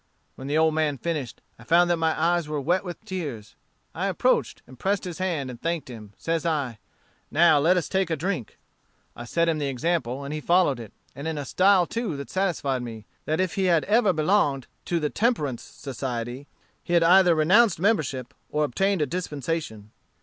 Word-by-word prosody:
"When 130 - -9
the 145 +2 0
old 160 0 +3
man 155 -2 0
finished, 145 -4 -4 0.2
I - - -13
found 170 +6 +4
that 170 - +2
my 160 -1 0
eyes 170 0 +1
were 150 -1 -2
wet 175 +8 +1
with 180 +3 -8
tears. 150 - -5 0.4
I - - -2
approached - - 0
and 130 0 -15
pressed 195 0 0
his 180 -1 -6
hand, 160 -8 -2
and 120 - -11
thanked 165 -4 -2
him, 120 - -7
and 105 -1 -16
says 165 0 -2
I, 140 -9 -1 0.5
'Now 160 -1 +5
let 170 +6 +3
us 175 - -1
take 190 -1 0
a 165 - +1
drink.' 170 - -4 0.6
I 120 - -8
set 170 +7 +1
him 160 -2 +1
the 145 - -1
example, 135 -1 -1
and 140 +2 -5
he 155 - -4
followed 170 -6 +3
it, 115 -3 -9 0.2
and 140 +4 -6
in 160 -1 -2
a 145 - -4
style 185 +3 +4
too 225 -6 -3
that 140 - -7
satisfied 165 -9 -1
me, 115 -3 -8 0.2
that 155 +1 -1
if 185 -2 0
he 195 - 0
had 170 -4 +3
ever 215 -1 +3
belonged 155 -5 +1 0.2
to 170 - 0
the 150 -2 -2
temperance 155 - 0
society, 125 0 -6 0.4
he 175 - -4
had 170 -1 +5
either 180 0 +6
renounced 185 +5 +4
membership, 150 - 0 0.2
or 150 0 0
obtained 190 +5 +1
a - - +1
dispensation. 145 - -4
160 Hz, 200 wpm, -25 LUFS, 135-180 Hz, 0.6 s, either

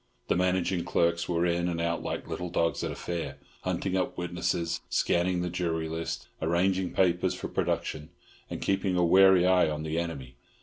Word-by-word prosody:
The - - +3
managing 90 -1 +1
clerks 85 0 +1
were 85 0 +1
in 85 0 +1
and 85 -1 -2
out 85 0 -1
like - - -4
little 90 0 -4
dogs 85 -1 0
at - - -1
a - - -5
fair, 85 -2 -4 0.2
hunting 95 -1 -2
up 95 - -1
witnesses, 85 -1 -2
scanning 90 +1 +1
the 90 - -2
jury 85 -2 -1
list, 80 +1 -4
arranging 90 +3 +1
papers 90 -2 +2
for - - -5
production, 75 0 -2 0.4
and - - -5
keeping 95 -1 +1
a 90 - +4
wary 95 0 +6
eye 90 -3 +4
on 75 0 -3
the 80 +1 -1
enemy. 70 -7 -5
85 Hz, 180 wpm, -28 LUFS, 85-90 Hz, 0.4 s, wary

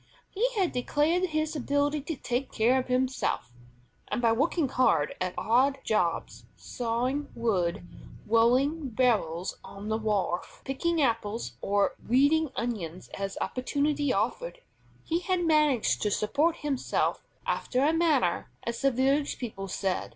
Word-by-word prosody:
He 465 +6 +1
had 380 -5 +1
declared 300 +8 +1
his 310 -2 -1
ability 285 +2 0
to 310 +3 -4
take 250 +1 -3
care 245 +4 +3
of 255 - -4
himself, 255 - -1 0.5
and - - -2
by 230 -2 +3
working 290 +6 +1
hard 205 - +2
at 185 0 -2
odd 260 +5 +3
jobs, 175 -6 -1
sawing 250 +4 -2
wood, 185 -7 0 0.4
rolling 255 +7 +3
barrels 210 -8 0
on 200 +2 -8
the 220 0 0
wharf, 200 -5 -2
picking 330 +5 0
apples 225 - -1
or 200 0 +1 0.2
weeding 285 +5 +4
onions 185 -8 -4
as 195 0 -5
opportunity 285 +2 0
offered, - - -2 0.4
he 335 +1 0
had 360 -1 0
managed 300 -7 +3
to 210 - +1
support 285 - +1
himself 275 -3 0 0.2
"after 255 - 0
a 305 +3 +3
manner," 300 - +2
as 235 0 -4
the 275 - +4
village 270 +3 +1
people 205 -6 -5
said. 190 0 -2
255 Hz, 135 wpm, -28 LUFS, 220-295 Hz, 0.5 s, weeding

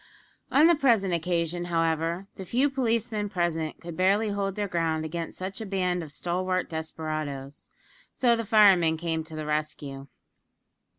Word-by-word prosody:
On 285 +4 +6
the 340 - +7
present 230 - +3
occasion, 170 0 -1
however, 165 +1 0
the 190 - -7
few 255 +9 +1
policemen 230 -5 0
present 165 -4 -1
could 170 -1 -8
barely 200 +4 +2
hold 200 -1 -2
their 205 -1 -1
ground 165 -3 -1
against 165 +1 -5
such 190 +3 -5
a - - -2
band 180 -2 0
of 155 -3 -8
stalwart 185 +3 -1
desperadoes, 155 -3 -5 0.5
so 240 -2 +4
the 230 - -2
firemen 195 -7 +5
came 160 -1 -2
to 160 0 -10
the 155 -1 -4
rescue. 150 -2 -3
175 Hz, 155 wpm, -27 LUFS, 160-200 Hz, 0.5 s, the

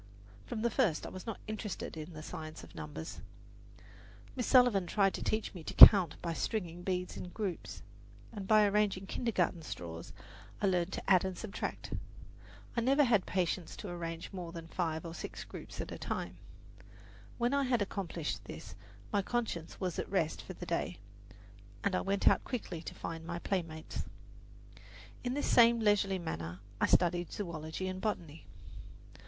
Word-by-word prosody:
From 230 -2 -3
the 235 - +2
first 215 - +2
I - - -5
was 185 +4 -8
not 225 - -4
interested 215 -5 -4
in 160 +2 -7
the 155 0 -8
science 155 0 -7
of - - -13
numbers. 150 +2 -7 1.1
Miss 250 -3 -1
Sullivan 245 -8 +5
tried 195 0 +3
to - - -4
teach 215 0 -1
me 175 -4 -8
to - - -5
count 185 -7 +11
by 170 -1 -1
stringing 175 -2 -2
beads 180 0 -2
in 180 - -6
groups, 195 -2 -4 0.5
and 205 -4 -6
by 215 0 +6
arranging 200 -2 +2
kintergarten 190 -6 0
straws 85 - -7 0.5
I - - +1
learned 180 -1 +2
to - - -5
add 185 -2 +6
and 190 -2 -3
subtract. 215 -2 -4 0.8
I 235 - +2
never 275 +5 +4
had 225 -7 +3
patience 180 -2 -1
to 200 - -7
arrange 165 -1 -5
more 175 -3 -5
than 165 -1 -8
five 165 -2 -2
or 165 - -5
six - - -6
groups - - -9
at - - -4
a - - -6
time. - - -3 1.0
When 240 +2 +1
I 280 - +3
had 245 -4 +2
accomplished 180 -5 -4
this - - -8 0.4
my 205 - +3
conscience 205 -7 -3
was 180 -3 -2
at - - -3
rest 165 -5 0
for - - -8
the - - -8
day, 85 +5 -1 0.9
and 200 - +1
I - - +1
went 195 0 0
out - - +6
quickly 195 -10 -4
to - - -7
find 165 -1 -5
my 170 +1 -4
playmates. 165 -4 -3 1.2
In 250 +1 -1
this 290 - 0
same 235 0 +6
leisurely 205 -3 +3
manner 85 - -5 0.2
I - - +3
studied 175 -1 +3
zoology 170 -1 -4
and 185 0 -4
botany. 165 - -3
185 Hz, 170 wpm, -33 LUFS, 165-210 Hz, 1.2 s, count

